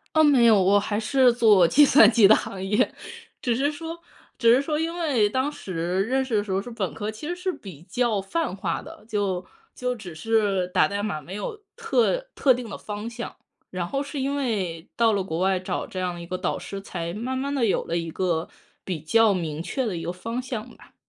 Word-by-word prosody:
哦， 315 - +6
没 270 -5 +5
有。 215 -4 +6
我 200 +2 +4
还 205 +1 -2
是 255 +2 +4
做 210 -7 +5
计 290 - +6
算 235 -6 +7
机 220 -3 +6
的 220 - +7
行 190 -1 -4
业， 205 +2 +1 0.5
只 240 -2 +1
是 285 +4 +1
说 330 +2 -7 0.4
只 235 -1 +5
是 265 - +4
说 300 +1 -2
因 330 +1 -1
为 260 -11 +2
当 260 +5 0
时 180 - -2
认 265 +4 0
识 250 -4 -2
的 205 - +1
时 200 - -6
候 190 +1 +1
是 245 - -9
本 205 -6 -3
科， 215 0 -4
其 220 +8 -8
实 350 - -2
是 365 +1 -2
比 175 - -11
较 215 +2 0
泛 250 - -2
化 195 - -2
的， 320 -5 -13
就 195 -4 -1 0.3
就 250 0 -2
只 180 -7 -9
是 200 -2 +1
打 185 - +3
代 200 0 -3
码 180 -8 -3
没 185 +4 -8
有 420 - -5
特 480 +1 +1 0.2
特 265 - +4
定 245 -3 -6
的 - - -6
方 210 +2 -6
向， 240 0 -7 0.3
然 180 -2 -3
后 275 +6 -2
是 285 0 -5
因 275 +2 -1
为 195 - -2
到 230 -2 +3
了 195 -2 0
国 165 -2 -4
外 190 0 +2
找 185 - -3
这 185 - -6
样 180 -1 -3
一 - - -7
个 185 +1 -4
导 - - -2
师， 195 -1 -7
才 170 -3 -5
慢 250 +5 -3
慢 280 +2 -2
地 260 -5 +1
有 200 - +1
了 170 - -2
一 165 -1 -3
个 170 -1 -1 0.4
比 180 -5 -3
较 220 +6 +4
明 160 -3 -3
确 260 +8 -2
的 190 -6 -2
一 165 - -5
个 170 - -2
方 230 +7 -4
向 245 -2 -5
吧。 - - -19
215 Hz, 250 characters per minute, -25 LUFS, 185-260 Hz, 0.5 s, 算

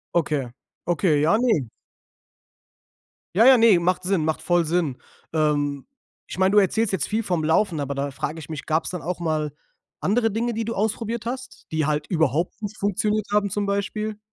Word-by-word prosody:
Okay, 150 -5 +1 0.4
okay, 170 -3 +2
ja, 165 +8 +4
ne. 225 - +1 1.7
Ja, 220 +4 +6
ja, 260 0 +8
ne, 225 -6 +6
macht 180 +1 0
Sinn, 185 -3 +1
macht 160 0 -1
voll 175 -1 +2
Sinn. 160 -5 0 0.4
Ähm, 145 -3 0 0.4
ich - - -8
meine, 190 0 +3
du - - +4
erzählst 205 +2 +1
jetzt 190 - 0
viel 220 +2 0
vom 180 -7 -1
Laufen, 160 0 +2
aber 140 0 -2
da 140 +1 -2
frage 150 +4 -4
ich 150 - -9
mich, 155 -2 -6
gab's 160 +1 0
dann 180 -3 -5
auch 175 +3 -3
mal 155 -3 -1 0.5
andere 225 +2 +1
Dinge, 235 +2 -1
die 225 - -2
du 230 +1 -3
ausprobiert 220 +2 -2
hast, 255 +1 -6
die 155 -1 +1
halt 150 0 -1
überhaupt 165 - 0
nicht 210 0 -5
funktioniert 210 +1 0
haben 205 -1 +2
zum 205 +1 -1
Beispiel? 205 +2 -2
180 Hz, 185 wpm, -24 LUFS, 155-215 Hz, 1.7 s, ja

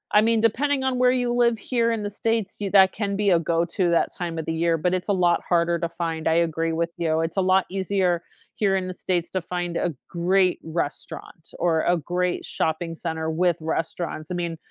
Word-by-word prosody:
I 210 - +8
mean, 225 0 +3
depending 270 +5 +1
on 260 -1 0
where 250 - +5
you 245 -1 +1
live 235 -1 +3
here 230 +1 0
in 225 -2 -2
the 205 - -2
States, 225 0 -1
you 200 - -1
that 190 -1 +6
can 200 -2 -2
be 200 -1 +2
a 170 - +5
go-to 170 +2 0
that 170 - +2
time 170 -2 -4
of 160 - -3
the 160 - -2
year, 165 0 +1
but 180 +4 0
it's 185 -1 -2
a 200 - +4
lot 175 -2 +2
harder 170 -1 +1
to 170 - -2
find, 165 -1 -3
I 160 - +3
agree 165 -1 +1
with 165 +1 -1
you; 160 -1 +1
it's 165 0 -3
a 195 - +4
lot 185 +1 +3
easier 190 -2 0 0.3
here 195 -2 +1
in 185 -1 -1
the 185 - -4
States 175 -2 -2
to 185 - -1
find 175 0 -4
a 175 - 0 0.2
great 180 +1 +2
restaurant 160 0 -5
or 165 -2 +2
a 175 +2 +2
great 180 +3 -2
shopping 165 +1 -2
center 160 -1 -3
with 175 +1 +1
restaurants, 160 0 -3
I - - -1
mean 170 -2 -3
175 Hz, 225 wpm, -24 LUFS, 165-195 Hz, 0.3 s, I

